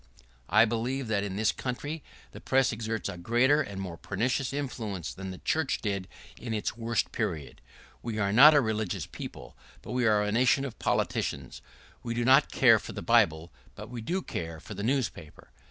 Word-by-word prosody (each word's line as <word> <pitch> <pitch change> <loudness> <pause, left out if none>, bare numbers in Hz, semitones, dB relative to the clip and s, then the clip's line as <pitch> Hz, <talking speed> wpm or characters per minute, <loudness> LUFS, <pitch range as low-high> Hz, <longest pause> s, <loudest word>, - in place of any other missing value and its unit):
I 110 +2 +6
believe 120 +3 -2
that 100 -2 +1
in 100 -2 -4
this 110 +1 +2
country 145 +5 -5 0.3
the - - -11
press 135 -1 +2
exerts 110 -1 -3
a 90 -3 -6
greater 125 +10 +3
and 100 -9 -6
a 95 - -3
more 85 -3 -7
pernicious 125 +6 -1
influence 115 - -4
than 95 0 -7
the 95 - -7
church 155 - 0
did 100 -3 -3 0.3
in 115 -2 -4
its 105 - -2
worst 115 -1 -1
period. 75 -6 -4 0.4
We 115 -2 -4
are 100 -2 0
not 150 +7 +9
a 145 - +6
religious 110 -5 -2
people, - - -9 0.3
but - - -8
we 125 -1 +1
are 105 -1 +3
a 105 - -1
nation 125 +4 +3
of 130 - -8
politicians. - - -2 0.4
We 115 -1 -4
do 120 0 0
not 135 +3 +5
care 115 -4 +6
for - - -8
the - - -6
Bible, 80 +2 +2 0.2
but - - -9
we 120 -2 -5
do 180 +12 -2
care 80 -1 -5
for 105 - -9
the 100 - -6
newspaper. 110 - -3
115 Hz, 195 wpm, -28 LUFS, 100-130 Hz, 0.4 s, not